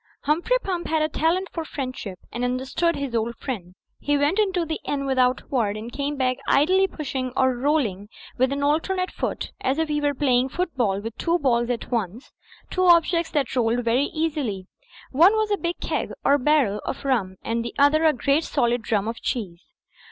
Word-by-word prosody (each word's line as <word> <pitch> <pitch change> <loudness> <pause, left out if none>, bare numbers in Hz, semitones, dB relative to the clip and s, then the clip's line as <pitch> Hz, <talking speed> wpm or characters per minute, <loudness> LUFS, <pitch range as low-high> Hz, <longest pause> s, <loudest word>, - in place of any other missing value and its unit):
Humphrey 340 +12 +2
Pump 360 -3 -3
had 315 -1 +1
a - - +2
talent 335 +5 0
for 330 - -4
friendship, 255 -10 -5
and 240 - -4
understood 260 +7 0
his 280 -3 -4
old 230 +1 -1
friend. 185 -9 -6 0.2
He 290 0 +1
went 290 +8 +1
into 380 -5 +1
the 315 0 -3
inn 280 -1 -2
without 255 -1 +2
a - - -29
word; 215 -6 0
and 225 +3 -7
came 285 +1 -2
back 255 -1 +1
idly 370 +7 +4
pushing 265 -6 -4
or 260 -1 +3
roll 290 +3 +2
ing 200 0 -6 0.3
with 260 +2 +2
an 280 0 -2
alternate 365 +6 0
foot - - -4
(as 265 +2 0
if 320 -1 0
he 295 0 0
were 290 -1 +1
playing 260 -2 +2
foot 355 +4 -3
ball 200 -7 +1
with 225 +1 -6
two 335 - 0
footballs 245 -8 +2
at 245 0 -3
once) 230 +2 -3 0.4
two 370 - 0
objects 340 -1 +4
that 280 -4 -1
rolled 240 0 +1
very 245 +5 +2
easily. 290 - -2 0.5
One 335 +9 +6
was 435 -1 0
a - - +4
big 345 -1 -3
keg - - -2 0.2
or 285 +1 +4
barrel 255 -7 +2
of - - -5
rum 215 -9 0
and 230 0 -1
the 235 - -6
other 285 +3 +4
a 315 - +6
great 280 +3 +1
solid 240 -5 0
drum 215 -2 0
of 230 +1 -3
a - - -13
cheese. 185 -8 -3
275 Hz, 205 wpm, -24 LUFS, 240-315 Hz, 0.5 s, One